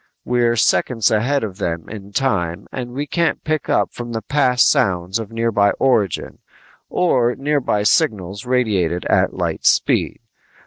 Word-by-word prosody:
We're 120 -1 +1
seconds 115 0 +2
ahead 125 +6 +1
of 100 -2 -6
them 85 -4 -3
in 100 -2 -9
time 100 -8 -1
and 125 -2 -5
we 140 +4 -3
can't 170 +2 -1
pick 155 -1 -2
up - - +1
from 120 -1 -7
the 110 -2 -4
past 125 0 +3
sounds 90 +2 +1
of 110 -2 -7
nearby 115 -3 +1
origin 110 - 0 0.5
or 125 -9 +1
nearby 140 -7 0
signals 105 - 0
radiated 105 -9 0
at - - +1
light - - -3
speed. - - +2
115 Hz, 145 wpm, -19 LUFS, 100-130 Hz, 0.5 s, past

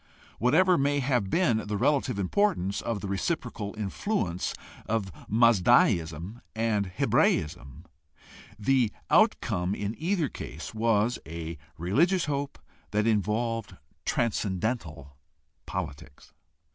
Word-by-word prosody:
Whatever 170 +8 +4
may 145 +1 +2
have 125 -7 +1
been 115 - +1
the 105 0 -1
relative 130 -2 +1
importance 100 - +1
of 115 -4 -3
the 100 - -4
reciprocal 105 - -3
influ 105 - -1
ence 90 - -3 0.3
of 110 -3 -1 0.2
Mazdaism 105 -4 +3
and 110 -2 +1
Hebraism, 75 -4 0 0.7
the 120 0 +2 0.2
outcome 105 - +3
in 105 +1 -3
either 170 -1 +1
case - - -8
was 110 +1 +1
a 80 +1 -5 0.2
religious 165 - +2
hope 140 -1 -3 0.3
that 105 +1 +1
involved 115 +1 0 0.3
transcendental 95 - -2 0.5
politics. 70 0 -6
110 Hz, 105 wpm, -28 LUFS, 95-130 Hz, 0.7 s, Whatever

